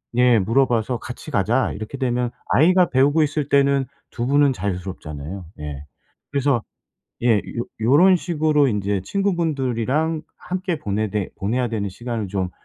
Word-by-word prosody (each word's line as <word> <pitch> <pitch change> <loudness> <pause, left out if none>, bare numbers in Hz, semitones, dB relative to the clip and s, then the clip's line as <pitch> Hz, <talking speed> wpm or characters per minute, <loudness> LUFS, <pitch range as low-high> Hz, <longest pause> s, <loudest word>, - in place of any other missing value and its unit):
예 125 -2 +5
물어봐서 120 +2 +1
"같이 - - -8
가자." - - +1
이렇게 110 +6 -6
되면 125 -2 0 0.2
아이가 180 +4 +4
배우고 145 +4 +3
있을 150 -1 -1
때는 140 -1 +3 0.3
2 120 - -3
분은 145 +1 +4
자유스럽잖아요. 90 - -5
예. 75 -1 -6 0.5
그래서 140 -4 +1 0.6
예. 115 -3 +4
요 120 +3 -5 0.2
요런 160 +11 +5
식으로 155 -5 +2
인제 100 -2 -1
친구분들이랑 155 - 0 0.2
함께 185 -3 -3
보내되 105 -3 -2
보내야 120 +5 0
되는 105 -3 -2
시간을 115 +1 -4
좀 95 -2 -2
125 Hz, 315 characters per minute, -22 LUFS, 105-145 Hz, 0.6 s, 예